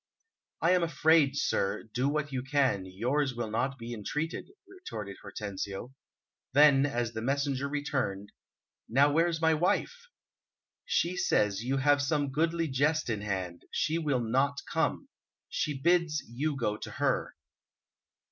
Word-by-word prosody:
"I 170 - +5
am 180 -1 +4
afraid, 160 -4 +3
sir, 100 -6 0
do 130 +3 +1
what 150 -1 -1
you 130 -2 -2
can, 135 -7 +1
yours 125 +8 -1
will 115 -2 -3
not 130 +5 -1
be 120 0 -6
entreated," 150 - -4 0.2
retorted 110 - -8
Hortensio. 100 +3 -6 0.6
Then, 145 -1 +6
as 120 -3 -2
the 110 - -4
messenger 140 +2 -1
returned, 130 -9 -2 0.6
"Now, 140 +5 +4
where's 165 +2 +2
my 160 0 +3
wife?" 195 - 0 0.8
"She 180 - +1
says 105 - +1
you 135 +3 0
have 145 +1 +3
some 145 -1 0
goodly 165 +3 +1
jest 145 0 +1
in 105 -2 -2
hand; 95 -4 -3
she 160 +1 0
will 145 -6 0
not 135 +5 +1
come. - - -1 0.4
She 145 -3 -2
bids 170 -1 +2
you 145 +6 -2
go 105 -5 -1
to - - -7
her." - - 0
140 Hz, 140 wpm, -30 LUFS, 115-155 Hz, 0.8 s, Then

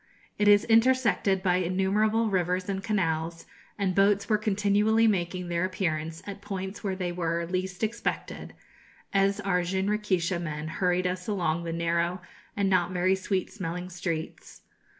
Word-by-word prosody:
It 210 - +3
is 205 0 +6
intersected 230 -5 +3
by 180 -2 +3
innumerable 200 +5 +1
rivers 180 0 0
and 195 -1 -3
canals, 165 -5 -1 0.3
and 195 -2 0
boats 200 +1 +3
were 215 -2 +2
continually 210 +2 +2
making 180 -3 0
their 170 0 -1
appearance 165 -4 -2
at 200 0 -7
points 195 0 -5
where 195 -2 -1
they 180 -2 -2
were 170 -1 -1
least 185 +2 -3
expected, 225 +2 -3 0.6
as 195 +1 +2
our 190 -3 +1
jinrikisha 190 -1 0
men 155 -2 -4
hurried 180 +2 0
us 180 0 -2
along 170 -5 -1
the 165 - -3
narrow 170 +2 0 0.4
and 200 -1 +2
not 180 -2 +2
very 185 +1 +2
sweet 190 0 -2
smelling 180 -2 -5
streets. 170 -2 -5
185 Hz, 150 wpm, -27 LUFS, 175-205 Hz, 0.6 s, is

